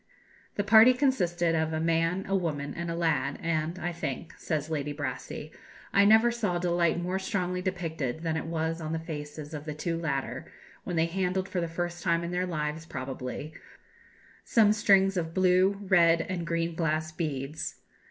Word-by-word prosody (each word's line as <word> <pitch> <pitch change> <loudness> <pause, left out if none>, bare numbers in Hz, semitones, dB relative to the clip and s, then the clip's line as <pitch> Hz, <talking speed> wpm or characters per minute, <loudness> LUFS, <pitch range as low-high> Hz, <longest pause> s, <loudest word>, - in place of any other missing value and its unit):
"The 205 - 0
party 220 +4 +8
consisted 175 - +1
of 160 0 0
a 155 - 0
man, 165 +3 +1
a 195 - +1
woman, 150 -6 -2
and 170 0 -4
a 165 - -2
lad; 165 -2 0
and, 165 +1 -1
I 175 0 -3
think," 160 -1 -5
says 155 -3 -2
Lady 150 -2 -2
Brassey, 145 -2 -5 0.4
"I 200 0 +6
never 220 +3 +6
saw 210 -7 -1
delight 175 -1 +1
more 180 +2 -1
strongly 180 -2 -2
depicted 160 -7 -3
than 160 -1 0
it 160 - -3
was 165 0 -2
on 155 0 -3
the - - 0
faces 150 -1 -7
of 150 -1 -6
the 150 -1 -5
two 165 +2 -2
latter, 140 -5 -3 0.3
when 175 - -3
they 160 0 +3
handled, 185 +2 -1
for 180 - -2
the 170 - -1
first 175 +1 -4
time 170 -1 +1
in 170 - -4
their 180 +1 -1
lives 155 -1 -3
probably, 130 +2 -5 0.9
some 215 -3 +4
strings 195 -2 +4
of 165 -1 -3
blue, 185 +1 +4
red, 170 -3 +5
and 175 -2 -4
green 165 0 -1
glass 155 -1 -1
beads. 150 -3 -4
170 Hz, 180 wpm, -28 LUFS, 160-185 Hz, 0.9 s, party